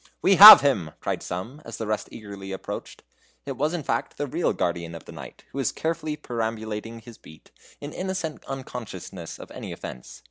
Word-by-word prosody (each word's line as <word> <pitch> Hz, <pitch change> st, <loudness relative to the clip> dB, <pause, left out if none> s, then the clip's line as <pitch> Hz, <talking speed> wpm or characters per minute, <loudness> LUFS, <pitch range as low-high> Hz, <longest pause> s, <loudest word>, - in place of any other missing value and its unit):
"We 195 Hz, -1 st, +5 dB
have 210 Hz, +2 st, +13 dB
him!" 100 Hz, -, 0 dB
cried -, -, -3 dB
some, 110 Hz, +12 st, -6 dB
as 115 Hz, -, -8 dB
the 110 Hz, -, -4 dB
rest 110 Hz, 0 st, -2 dB
eagerly 100 Hz, -3 st, -9 dB
approached. 95 Hz, -, -7 dB, 0.4 s
It 140 Hz, -, -4 dB
was 150 Hz, +5 st, -1 dB
in 165 Hz, -, -4 dB
fact 115 Hz, -2 st, -2 dB
the 145 Hz, -, -2 dB
real 160 Hz, +6 st, -1 dB
guardian 85 Hz, -1 st, -3 dB
of 80 Hz, -, -11 dB
the -, -, -11 dB
night, -, -, -11 dB
who 140 Hz, -, -6 dB
was 135 Hz, -, 0 dB
carefully 160 Hz, -1 st, -3 dB
perambulating 115 Hz, -3 st, -5 dB
his 115 Hz, 0 st, -14 dB
beat, 80 Hz, -, -17 dB, 0.3 s
in 145 Hz, +1 st, -8 dB
innocent 185 Hz, -4 st, -4 dB
unconsciousness 110 Hz, -10 st, -7 dB
of -, -, -12 dB
any -, -, -8 dB
offence. 60 Hz, -, -9 dB
115 Hz, 185 wpm, -25 LUFS, 100-150 Hz, 0.4 s, have